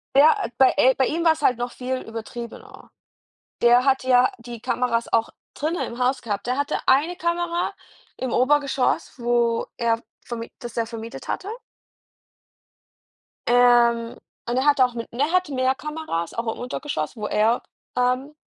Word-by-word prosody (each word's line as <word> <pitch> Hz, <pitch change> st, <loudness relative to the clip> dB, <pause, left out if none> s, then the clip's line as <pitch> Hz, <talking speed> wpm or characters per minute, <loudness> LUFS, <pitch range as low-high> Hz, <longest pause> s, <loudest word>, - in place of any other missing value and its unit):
Ja, 295 Hz, +8 st, +7 dB
äh, -, -, -3 dB
bei 265 Hz, -1 st, +5 dB
e 265 Hz, -2 st, +5 dB
bei 265 Hz, -, +2 dB
ihm 330 Hz, +6 st, -1 dB
war's 320 Hz, -1 st, +3 dB
halt 250 Hz, -, +3 dB
noch 245 Hz, 0 st, -3 dB
viel 255 Hz, +1 st, -3 dB
übertriebener. 230 Hz, +1 st, -9 dB, 0.7 s
Der 240 Hz, +1 st, +6 dB
hat 270 Hz, -1 st, +2 dB
ja 255 Hz, 0 st, +4 dB
die 235 Hz, -1 st, -9 dB
Kameras 245 Hz, -2 st, -1 dB
auch 230 Hz, 0 st, +2 dB, 0.2 s
drinnen 320 Hz, +4 st, -2 dB
im 235 Hz, -, -8 dB
Haus 255 Hz, +1 st, +1 dB
gehabt. 205 Hz, -3 st, -3 dB
Der 250 Hz, +1 st, 0 dB
hatte 285 Hz, 0 st, -1 dB
1 300 Hz, +7 st, +3 dB
Kamera 345 Hz, 0 st, -1 dB, 0.4 s
im 255 Hz, -2 st, -3 dB
Obergeschoss, 275 Hz, 0 st, +1 dB
wo 235 Hz, -1 st, +1 dB
er 230 Hz, -1 st, 0 dB, 0.2 s
verm 235 Hz, -1 st, -5 dB, 0.2 s
das 240 Hz, -1 st, -8 dB
er 230 Hz, -1 st, 0 dB
vermietet 230 Hz, 0 st, -8 dB
hatte. 390 Hz, -, -3 dB, 2.0 s
Ähm, 240 Hz, -1 st, +4 dB, 0.3 s
und 245 Hz, -, 0 dB
er 260 Hz, -, +1 dB
hat 290 Hz, -2 st, +4 dB
auch 250 Hz, -1 st, +4 dB
mit 230 Hz, -1 st, -5 dB
und 235 Hz, -, -9 dB
er 295 Hz, +3 st, +2 dB
hatte 365 Hz, -5 st, +1 dB
mehr 255 Hz, 0 st, +2 dB
Kameras 300 Hz, -, -4 dB
auch 230 Hz, -1 st, -2 dB
im -, -, -12 dB
Untergeschoss, 245 Hz, -, -4 dB
wo 210 Hz, -2 st, -4 dB
er, 220 Hz, +3 st, +2 dB, 0.4 s
ähm, 255 Hz, +4 st, 0 dB
250 Hz, 165 wpm, -23 LUFS, 235-280 Hz, 2.0 s, Ja